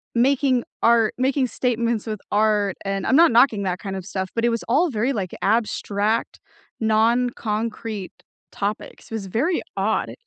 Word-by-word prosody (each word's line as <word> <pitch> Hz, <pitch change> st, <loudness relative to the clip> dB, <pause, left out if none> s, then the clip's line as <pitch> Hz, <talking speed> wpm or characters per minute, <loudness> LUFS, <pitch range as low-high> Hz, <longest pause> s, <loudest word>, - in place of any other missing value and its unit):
making 255 Hz, 0 st, +2 dB, 0.2 s
art 230 Hz, -2 st, +4 dB
making 260 Hz, +1 st, +1 dB
statements 235 Hz, -3 st, -1 dB
with 215 Hz, -2 st, -4 dB
art, 210 Hz, -2 st, +2 dB
and 195 Hz, -1 st, -2 dB
I'm 260 Hz, -, +3 dB
not 335 Hz, 0 st, +6 dB
knocking 230 Hz, -3 st, +4 dB
that 180 Hz, -1 st, -2 dB
kind 195 Hz, -2 st, -5 dB
of 190 Hz, -2 st, -6 dB
stuff, 190 Hz, -1 st, -4 dB
but 230 Hz, -, 0 dB
it -, -, +4 dB
was 230 Hz, -1 st, -2 dB
all 310 Hz, +8 st, +3 dB
very 240 Hz, +3 st, 0 dB
like 195 Hz, -6 st, -3 dB
abstract, 215 Hz, 0 st, 0 dB, 0.4 s
non-concrete 220 Hz, -2 st, 0 dB, 0.4 s
topics. 205 Hz, +1 st, -4 dB
It -, -, -6 dB
was 200 Hz, -3 st, -5 dB
very 290 Hz, -, 0 dB, 0.2 s
odd. -, -, 0 dB
225 Hz, 160 wpm, -22 LUFS, 205-245 Hz, 0.4 s, not